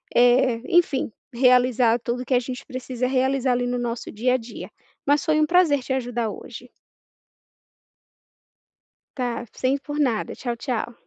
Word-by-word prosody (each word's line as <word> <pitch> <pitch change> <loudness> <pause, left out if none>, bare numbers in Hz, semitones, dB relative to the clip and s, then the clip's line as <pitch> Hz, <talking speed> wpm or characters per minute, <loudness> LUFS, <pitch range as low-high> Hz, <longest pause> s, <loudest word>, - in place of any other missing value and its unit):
eh, 245 -1 +4
enfim, 290 -9 +2 0.2
realizar 250 -1 +4
tudo 245 +2 -3
que 255 - -1
a 245 - +5
gente 255 +2 -7
precisa 255 -2 -4
realizar 265 0 +1
ali 245 0 0
no 245 0 -1
nosso 240 -1 -4
dia 250 +4 +1
a - - +3
dia. 235 0 -9 0.4
Mas 290 0 +2
foi 310 0 +2
um - - +4
prazer 315 -4 +3
te - - -6
ajudar 240 -3 -2
hoje. - - -10 2.5
Tá, 240 -2 -2
sem 265 +2 0
por 290 +1 -7
nada. 250 -7 0
Tchau, 240 -2 -4
tchau. 240 -2 -3
250 Hz, 150 wpm, -23 LUFS, 240-270 Hz, 2.5 s, a